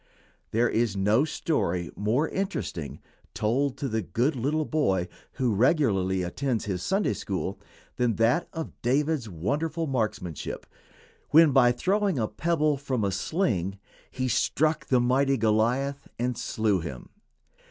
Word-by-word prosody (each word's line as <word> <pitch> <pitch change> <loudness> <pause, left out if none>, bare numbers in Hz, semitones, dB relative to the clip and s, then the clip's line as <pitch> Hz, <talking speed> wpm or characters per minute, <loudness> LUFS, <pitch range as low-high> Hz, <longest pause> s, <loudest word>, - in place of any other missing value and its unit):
There 120 +2 +2
is 110 -3 0
no 105 +8 +3
story 90 - -1
more 115 +10 +1
interesting, 190 - -4 0.4
told 130 +5 0
to 140 - -2
the 110 -2 -1
good 125 - 0
little 150 +5 0
boy 95 - +1 0.3
who 125 -5 0
regularly 100 - +2
attends 120 +6 -2
his 95 -4 -2
Sunday 195 - +1
school, 95 -1 -4 0.4
than 120 -3 +1
that 115 - +2
of 160 -1 -7
David's 140 0 +1
wonderful 150 - -2
marksmanship 110 - -3 0.6
when, 160 -1 +7
by 125 -2 +5
throwing 190 +7 +1
a 110 -3 0
pebble 155 -1 +1
from 130 -5 -2
a 100 - +1
sling, 100 - -1 0.3
he 130 0 -2
struck 155 +5 +1
the 130 - +3
mighty 135 +3 +2
Goliath 120 +6 +1
and 125 +1 -1
slew 110 -3 0
him. 80 -7 -7
125 Hz, 135 wpm, -27 LUFS, 105-145 Hz, 0.6 s, when